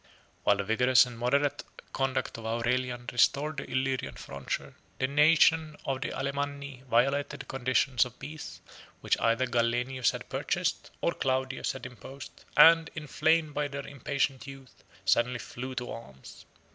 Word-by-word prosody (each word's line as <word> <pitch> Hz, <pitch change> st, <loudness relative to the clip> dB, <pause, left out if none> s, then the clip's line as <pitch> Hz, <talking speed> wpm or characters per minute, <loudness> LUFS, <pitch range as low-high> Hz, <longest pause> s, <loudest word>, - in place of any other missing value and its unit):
] -, -, -35 dB
While 100 Hz, -, +4 dB
the 100 Hz, -, -1 dB
vigorous 125 Hz, +5 st, +5 dB
and 125 Hz, -1 st, -9 dB
moderate 140 Hz, +5 st, +1 dB, 0.3 s
conduct 135 Hz, -1 st, -1 dB
of 115 Hz, -, -9 dB
Aurelian 120 Hz, +2 st, -1 dB
restored 145 Hz, +5 st, +2 dB
the 135 Hz, -, -5 dB
Illyrian 130 Hz, 0 st, -1 dB
frontier, 70 Hz, -1 st, -5 dB, 0.2 s
the -, -, +1 dB
nation 155 Hz, +2 st, +4 dB
of 135 Hz, -1 st, -2 dB
the -, -, -2 dB
Alemanni 140 Hz, 0 st, -3 dB
25 130 Hz, +2 st, -21 dB
violated 135 Hz, +5 st, +1 dB
the -, -, -11 dB
conditions 130 Hz, -1 st, +1 dB
of 125 Hz, -1 st, -9 dB
peace, 150 Hz, +3 st, -8 dB, 0.4 s
which -, -, +2 dB
either 115 Hz, +3 st, +2 dB
Gallienus 120 Hz, +1 st, +1 dB
had -, -, -5 dB
purchased, -, -, -2 dB
or -, -, +1 dB
Claudius 130 Hz, 0 st, -1 dB
had 135 Hz, -, -8 dB
imposed, 130 Hz, +3 st, -11 dB
and, 165 Hz, 0 st, +8 dB
inflamed 155 Hz, 0 st, +1 dB
by 145 Hz, 0 st, -1 dB
their 140 Hz, 0 st, -6 dB
impatient 140 Hz, -1 st, -2 dB
youth, 135 Hz, -2 st, -12 dB, 0.2 s
suddenly 120 Hz, +5 st, +3 dB
flew 130 Hz, +2 st, -7 dB
to 125 Hz, -1 st, -4 dB
arms. 65 Hz, -13 st, -11 dB
130 Hz, 155 wpm, -29 LUFS, 120-140 Hz, 0.4 s, and